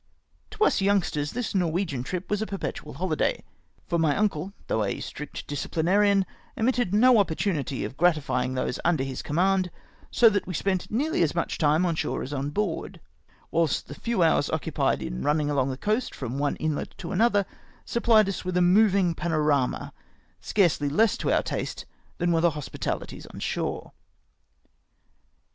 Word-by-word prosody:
To 430 Hz, 0 st, -1 dB
us 430 Hz, -, +3 dB
youngsters, 190 Hz, -7 st, +1 dB
tliis 245 Hz, -2 st, -3 dB
Norwegian 175 Hz, -6 st, 0 dB
trip 180 Hz, +8 st, -4 dB
was 210 Hz, 0 st, -1 dB
a 220 Hz, -, -2 dB
perpetual 190 Hz, -6 st, -5 dB
hohday, 170 Hz, -3 st, -1 dB, 0.4 s
for 170 Hz, -1 st, 0 dB
my 155 Hz, -3 st, +2 dB
uncle, 195 Hz, -4 st, 0 dB
though 110 Hz, -, 0 dB
a 100 Hz, -, -2 dB
strict 150 Hz, 0 st, -7 dB
disciplinarian, 190 Hz, +7 st, +2 dB, 0.3 s
omitted 245 Hz, -3 st, +1 dB
no 235 Hz, +3 st, +6 dB
opportunity 160 Hz, -7 st, -1 dB
of 135 Hz, -, -8 dB
gratifymg 140 Hz, -7 st, +1 dB
those 130 Hz, 0 st, -2 dB
mider 165 Hz, -5 st, +2 dB
liis 135 Hz, -1 st, -5 dB
command, 185 Hz, +4 st, +1 dB, 0.4 s
so 235 Hz, -, +5 dB
that 205 Hz, -3 st, +2 dB
we 180 Hz, -, -4 dB
spent 185 Hz, +2 st, -1 dB
nearly 280 Hz, -, 0 dB
as 165 Hz, -2 st, +1 dB
much 170 Hz, -, -2 dB
time 155 Hz, +3 st, +3 dB
on 170 Hz, -, +1 dB
shore 160 Hz, -, -2 dB
as 140 Hz, -, -6 dB
on 140 Hz, 0 st, -2 dB
board; 180 Hz, +1 st, -3 dB, 0.5 s
whilst 165 Hz, -3 st, +1 dB
the -, -, -7 dB
few 230 Hz, +3 st, 0 dB
hours 160 Hz, -3 st, +3 dB
occupied -, -, 0 dB
in -, -, -4 dB
rimning 150 Hz, 0 st, +1 dB
along 135 Hz, -2 st, +1 dB
the 130 Hz, -, -4 dB
coast 215 Hz, -, -1 dB
from 130 Hz, +1 st, -4 dB
one 145 Hz, 0 st, 0 dB
inlet 155 Hz, -2 st, -3 dB
to 170 Hz, -, -6 dB
another 205 Hz, 0 st, +3 dB, 0.4 s
sup 235 Hz, -, -3 dB
phed 220 Hz, -3 st, +6 dB
us 195 Hz, -, -3 dB
with 180 Hz, 0 st, -2 dB
a -, -, +4 dB
movmg 185 Hz, -1 st, +4 dB
panorama, 150 Hz, -5 st, 0 dB, 0.5 s
scarcely 170 Hz, -7 st, +1 dB
less 215 Hz, +10 st, +3 dB
to -, -, -1 dB
our -, -, +3 dB
taste -, -, -4 dB, 0.3 s
than 175 Hz, 0 st, +1 dB
were 165 Hz, -1 st, +2 dB
the 170 Hz, -, +5 dB
hospitahties 150 Hz, -2 st, -5 dB
on -, -, -9 dB
shore. -, -, -3 dB
175 Hz, 170 wpm, -26 LUFS, 150-200 Hz, 0.5 s, no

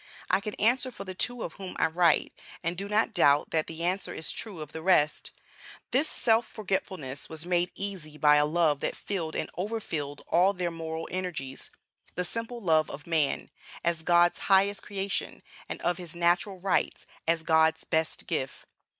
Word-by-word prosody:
I -, -, +4 dB
can 210 Hz, +1 st, -5 dB
answer 250 Hz, +4 st, +2 dB
for 230 Hz, -, -8 dB
the 185 Hz, -1 st, -6 dB
two 245 Hz, +5 st, -1 dB
of 165 Hz, -, -5 dB
whom 190 Hz, -2 st, -7 dB
I -, -, +3 dB
write, 165 Hz, 0 st, +3 dB, 0.3 s
and 170 Hz, +1 st, -1 dB
do 200 Hz, +3 st, -4 dB
not 215 Hz, +2 st, +2 dB
doubt 145 Hz, -6 st, +4 dB
that 160 Hz, -1 st, +1 dB
the 165 Hz, +1 st, -6 dB
answer 185 Hz, +3 st, 0 dB
is 160 Hz, -, +1 dB
true 205 Hz, -7 st, -5 dB
of 150 Hz, -1 st, -7 dB
the 160 Hz, -, -6 dB
rest: 160 Hz, -4 st, +3 dB, 0.6 s
This 280 Hz, +5 st, +3 dB
self 225 Hz, 0 st, +3 dB
forgetfulness 190 Hz, -9 st, -4 dB
was 160 Hz, +1 st, -4 dB
made 175 Hz, 0 st, +1 dB
easy 185 Hz, -7 st, -4 dB
by 150 Hz, 0 st, +6 dB
a 150 Hz, -, +4 dB
love 155 Hz, -2 st, +2 dB
that -, -, -2 dB
filled 170 Hz, -6 st, -3 dB
and -, -, -1 dB
overfilled 165 Hz, -8 st, -3 dB
all 180 Hz, +4 st, +4 dB
their 180 Hz, -2 st, -2 dB
moral 160 Hz, 0 st, -5 dB
energies 175 Hz, -8 st, -4 dB, 0.5 s
the 180 Hz, -, -1 dB
simple 230 Hz, +5 st, -3 dB
love 160 Hz, -4 st, +3 dB
of 150 Hz, -, -8 dB
man, 160 Hz, -4 st, 0 dB, 0.3 s
as 170 Hz, -1 st, +1 dB
God's 175 Hz, +1 st, +4 dB
highest 195 Hz, +1 st, +4 dB
creation, 200 Hz, -1 st, -3 dB, 0.3 s
and -, -, -4 dB
of 175 Hz, 0 st, +1 dB
his 175 Hz, -2 st, -5 dB
natural 175 Hz, +3 st, +1 dB
rights, 190 Hz, 0 st, 0 dB, 0.2 s
as 165 Hz, 0 st, +2 dB
God's 160 Hz, 0 st, +3 dB
best 160 Hz, 0 st, -1 dB
gift. 135 Hz, -6 st, -3 dB
175 Hz, 180 wpm, -28 LUFS, 160-195 Hz, 0.6 s, by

